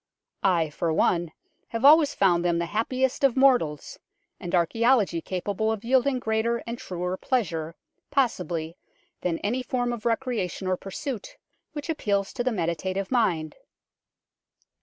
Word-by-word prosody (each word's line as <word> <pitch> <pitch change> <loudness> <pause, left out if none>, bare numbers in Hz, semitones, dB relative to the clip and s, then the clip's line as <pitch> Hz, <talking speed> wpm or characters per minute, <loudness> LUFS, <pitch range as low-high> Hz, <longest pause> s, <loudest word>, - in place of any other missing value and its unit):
I, 170 -5 +2
for 165 +2 -1
one, 170 +1 +1 0.4
have 230 +3 -2
always 300 0 +7
found 175 -3 +3
them 175 -1 +1
the 170 - 0
happiest 255 +8 -1
of 270 -2 +3
mortals, 245 - +2 0.4
and 175 - -2
archaeology 205 0 +2
capable 200 +5 -2
of 220 -2 -4
yielding 260 +2 +2
greater 230 0 -1
and 235 +1 -5
truer 180 0 -4
pleasure, 165 -11 -2 0.3
possibly, 180 - -1 0.4
than 170 -2 -1
any 235 +6 0
form 245 -1 -1
of 230 -3 -6
recreation 230 -6 -2
or 185 0 +1
pursuit 260 - -6 0.4
which 295 -2 -6
appeals 200 - -1
to 245 - -2
the 255 - +1
meditative 185 +1 -2
mind." 175 - +1
210 Hz, 140 wpm, -26 LUFS, 175-250 Hz, 0.4 s, always